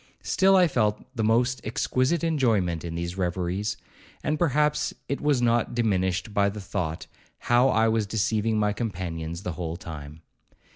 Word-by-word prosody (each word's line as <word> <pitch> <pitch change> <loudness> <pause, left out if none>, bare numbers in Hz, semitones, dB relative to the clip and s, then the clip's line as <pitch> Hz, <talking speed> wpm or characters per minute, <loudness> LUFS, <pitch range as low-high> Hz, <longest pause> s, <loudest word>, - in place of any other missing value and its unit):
Still 195 0 +4
I 180 -2 +6
felt 110 -8 0
the 115 - -1
most 120 +4 +2
exquisite 130 +8 0
enjoyment 110 - +1
in 85 -1 -5
these 85 +2 -4
reveries, 90 +3 -1 0.5
and 150 0 -1
perhaps 150 -2 +1
it 140 - -3
was 145 -4 +2
not 120 0 +1
diminished 100 -2 0
by 100 -1 +3
the 105 +1 -7
thought 85 -4 -3 0.3
how 120 +2 +3
I 110 -2 +3
was 110 -2 +1
deceiving 110 +1 0
my 105 -1 +2
companions 90 -5 -4
the 90 - -2
whole 85 0 -4
time. 80 -2 -9
105 Hz, 155 wpm, -26 LUFS, 90-120 Hz, 0.5 s, I